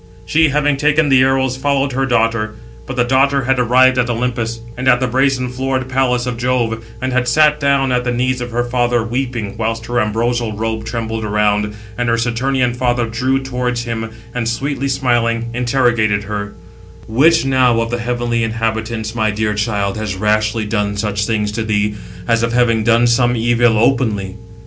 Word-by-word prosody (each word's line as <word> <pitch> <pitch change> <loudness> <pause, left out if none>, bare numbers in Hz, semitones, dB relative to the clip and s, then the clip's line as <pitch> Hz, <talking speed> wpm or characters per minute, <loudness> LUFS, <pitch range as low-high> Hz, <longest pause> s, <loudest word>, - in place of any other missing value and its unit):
She, 160 0 +3
having 145 0 +1
taken 150 +1 +2
the 130 -1 +5
arrows, 130 -1 +1
followed 140 0 0
her 135 +1 -1
daughter. 115 -3 0 0.3
But 130 - -5
the 125 - +2
daughter 135 +2 +2
had 130 +1 +1
arrived 130 +1 +4
at 125 0 +1
Olympus, 115 -1 -2 0.2
and 130 +1 -4
at 125 -1 +5
the 130 - 0
brazen 130 +1 +1
floored 130 +1 -2
palace 130 -2 0
of 125 -1 -3
Jove, 120 -3 -1 0.2
and 130 0 -2
had 125 -1 +1
sat 150 +3 +4
down 140 -2 +2
at 125 0 +1
the 125 - -1
knees 125 +1 -1
of 120 - -4
her 120 +1 -1
father, 120 -1 0
weeping, 120 -3 -3
whilst 115 0 -2
her 120 +1 0
ambrosial 115 +1 -1
robe 110 +1 -3
trembled 115 -1 -4
around; 105 0 0 0.2
and 120 -1 0
her 115 - +3
the 115 - -1
Saturnian 125 +1 0
father 120 -1 0
drew 130 +4 -1
towards 125 -2 -2
him, 115 -1 -4 0.2
and, 120 -2 -1
sweetly 140 +3 -2
smiling, 120 -3 0
interrogated 120 -4 +1
her: 100 0 -5 0.5
"Which 150 +8 +3
now 130 -3 +3
of 115 0 -2
the 120 - -2
heavenly 120 -1 -1
inhabitants, 110 0 -2
my 110 -2 0
dear 105 0 -1
child, 105 -1 -1
has 105 -3 -3
rashly 110 +2 0
done 105 -1 -1
such 105 0 -1
things 105 -2 -1
to 110 +2 -3
thee, 105 -1 0 0.3
as 115 0 +2
if 115 0 -1
having 115 -2 +2
done 115 +1 +3
some 120 +1 +2
evil 120 0 +2
openly?" 110 -5 +1
120 Hz, 185 wpm, -17 LUFS, 110-130 Hz, 0.5 s, the